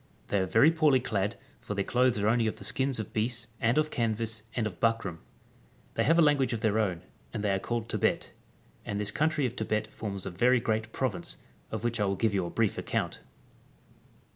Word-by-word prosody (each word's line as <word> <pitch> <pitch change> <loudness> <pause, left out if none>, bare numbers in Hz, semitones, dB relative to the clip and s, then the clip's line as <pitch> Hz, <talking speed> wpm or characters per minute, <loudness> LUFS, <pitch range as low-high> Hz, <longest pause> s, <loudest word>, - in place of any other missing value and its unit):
They 100 - +2
are 95 - 0
very 145 - +5
poorly 155 -5 +4
clad, 105 -3 -1 0.2
for 105 - -5
their 100 - 0
clothes 125 -1 +2
are 105 0 +1
only 115 0 +3
of 110 - -2
the - - -10
skins 135 -2 +1
of 110 - -5
beasts, 115 +1 0
and 120 +1 +2
of 155 0 +2
canvass, 115 -1 -1
and 120 - 0
of 95 -5 -5
buckram.^ 115 -7 0 0.7
They - - +1
have 165 +2 +4
a 170 - +7
lan 150 -1 +5
guage 135 -2 +1
of 115 - -3
their 110 0 +2
own, 90 -5 -1 0.3
and 110 -3 -4
they 105 - +2
are 95 - +1
called 115 +2 -3
Tebet. - - 0 0.5
And 100 -1 -3
this 105 -1 0
country 150 +2 +1
of 125 0 -2
Tebet 110 -2 -1
forms 100 -4 -6
a - - -4
very 125 +8 +3
great 110 -1 -1
province, 110 -10 -2 0.3
of - - -4
which 120 -1 0
I 105 - +2
will 100 0 0
give 110 +2 +1
you 95 -3 0
a - - -5
brief 110 0 0
account. - - -2
110 Hz, 220 wpm, -29 LUFS, 105-125 Hz, 0.7 s, a